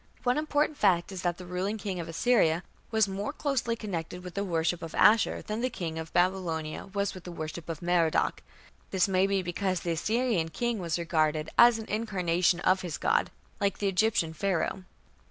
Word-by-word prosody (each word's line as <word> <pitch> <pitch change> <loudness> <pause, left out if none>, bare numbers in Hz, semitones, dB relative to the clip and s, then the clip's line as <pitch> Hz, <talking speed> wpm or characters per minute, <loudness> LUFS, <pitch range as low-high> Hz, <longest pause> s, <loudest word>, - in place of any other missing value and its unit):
One 250 +3 +2
important 300 -1 0
fact 180 -3 +3
is 190 -2 -5
that 175 -2 -1
the 180 - -9
ruling 185 +4 -2
king 195 -4 -4
of 165 - -5
Assyria 170 -3 +2 0.3
was 220 -2 +3
more 195 +5 -3
closely 270 -6 -1
connected 180 -5 -5
with 180 -1 -8
the 200 - -2
worship 170 -2 0
of 165 - -7
Ashur 220 +1 +4
than 215 +2 -3
the 255 - +1
king 165 -7 -4
of 160 0 -7
Babylonia 175 -3 0
was 200 0 -2
with 185 - -10
the 175 - -7
worship 160 0 -6
of 165 0 -5
Merodach. 170 -2 +2 0.5
This 190 -1 +2
may 190 0 +2
be 195 -1 0
because 185 +1 -1
the 170 - -2
Assyrian 215 0 0
king 240 +6 -2
was 170 -2 -1
regarded 155 -2 0
as 235 -1 +7
an 220 - -6
incarnation 180 -5 +1
of 185 +1 +3
his 175 -4 -4
god, - - +1 0.3
like 200 -1 0
the 205 - -1
Egyptian 195 -4 +1
Pharaoh. 185 +1 -1
185 Hz, 190 wpm, -29 LUFS, 170-210 Hz, 0.5 s, as